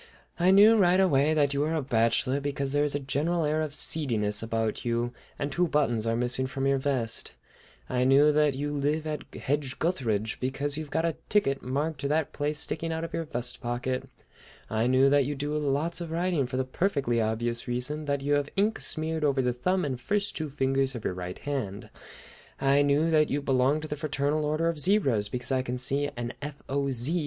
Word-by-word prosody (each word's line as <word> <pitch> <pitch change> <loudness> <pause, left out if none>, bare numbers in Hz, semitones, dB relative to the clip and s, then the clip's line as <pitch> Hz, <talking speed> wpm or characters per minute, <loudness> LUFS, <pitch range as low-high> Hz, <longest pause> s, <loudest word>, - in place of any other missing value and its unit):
I 175 +2 +4
knew 210 +4 +7
right 185 -2 +4
away 155 -4 +3
that 145 -2 +2
you 140 - -1
were 155 +3 0
a 155 - 0
bachelor, 130 +2 +1
because 140 -1 -2
there 145 0 +3
is 145 -1 0
a - - 0
general 150 +5 0
air 155 +1 +1
of 150 -2 -3
seediness 110 -12 0
about 115 -1 -2
you 120 0 -1 0.2
and 145 0 -3
two 175 +3 +1
buttons 120 -8 +1
are 115 - +1
missing 125 +2 +1
from 135 0 -3
your 135 0 +2
vest; 130 -5 -2 0.5
I 125 0 0
knew 140 +3 +5
that 150 -2 +2
you 145 +2 -3
live 150 +2 0
at 155 -1 -5
Hedge 140 -2 -2
gutheridge, 110 - -1
because 140 +3 -1
you've 155 -1 -5
got 160 +3 0
a 165 -2 -1
ticket 140 -10 +2
marked 145 +5 -2
to 140 - -2
that 150 0 0
place 150 +1 -1
sticking 165 +2 -2
out 160 0 -3
of 165 - -6
your 165 - -2
vest 125 -4 -2
pocket; 125 +2 -3 0.6
I 110 +2 +1
knew 130 +2 +4
that 140 -2 +4
you 145 +2 -2
do 145 +2 -3
lots 150 +4 -1
of 170 - -5
writing, 165 -4 0
for 130 +1 -4
the 130 - 0
perfectly 135 - 0
obvious 115 +2 -1
reason 125 +5 -2
that 140 -1 -1
you 145 +1 0
have 145 0 +1
ink 210 +3 +1
smeared 160 0 -2
over 140 -3 +2
the 125 0 +1
thumb 180 +9 0
and 130 -3 -3
first 205 +7 -1
two 155 -2 -3
fingers 135 -1 0
of 115 - -7
your - - 0
right 90 0 -6
hand; 125 -9 -4 0.7
I 140 +1 +3
knew 145 +3 +2
that 155 -1 +4
you 145 - 0
belong 135 +2 +2
to 155 - -6
the 150 - -3
Fraternal 150 0 -1
Order 155 +2 0
of 165 -2 -1
Zebras, 135 - +2
because 125 +2 -3
I 130 -1 +2
can 125 -1 -4
see 140 +3 -1
an 120 0 -4
F. 145 0 -5
O. 140 0 -1
Z. 135 +7 -1
140 Hz, 215 wpm, -28 LUFS, 125-155 Hz, 0.7 s, knew